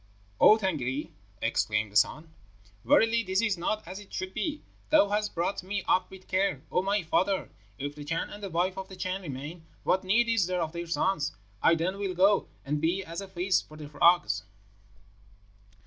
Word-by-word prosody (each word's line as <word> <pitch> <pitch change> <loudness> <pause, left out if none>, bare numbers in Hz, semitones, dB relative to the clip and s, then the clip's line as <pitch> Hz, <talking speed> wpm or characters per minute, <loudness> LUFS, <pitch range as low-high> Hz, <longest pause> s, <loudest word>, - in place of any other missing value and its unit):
"'O 215 - +8
Tângâri,' 150 - -2 0.3
exclaimed 110 -2 0
the - - -18
son, 155 +8 +2 0.5
'verily 230 +1 +4
this 190 -3 0
is 215 -3 +2
not 210 +5 -2
as 190 - -6
it 205 - -14
should 185 0 -4
be! 305 -2 -3 0.3
Thou 305 -10 +5
hast 210 +1 -1
brought 175 +4 -1
me 195 +1 -3
up 185 - +2
with 190 -1 -13
care, 185 -7 0
O - - +2
my 200 +1 0
father! 190 +4 0 0.3
If 145 +1 -4
the 145 0 -9
Chan 165 +3 -2
and 205 - -9
the 200 - -4
wife 180 +3 0
of 190 - -7
the 190 - -9
Chan 185 +1 -3
remain, 150 +1 -7 0.2
what 190 - +2
need 225 +6 +3
is 225 -6 +2
there 180 -2 0
of 160 - -4
their 170 0 -5
son? 180 +2 +1 0.4
I 165 - +5
then 180 +4 -2
will 195 -3 -2
go, 195 +3 +4 0.2
and 145 +1 -1
be 175 +4 +1
as 170 +3 -5
a 195 - -7
feast 185 0 0
for 155 - -13
the 150 -1 -8
frogs.' 170 +4 +3
185 Hz, 195 wpm, -29 LUFS, 165-195 Hz, 0.5 s, O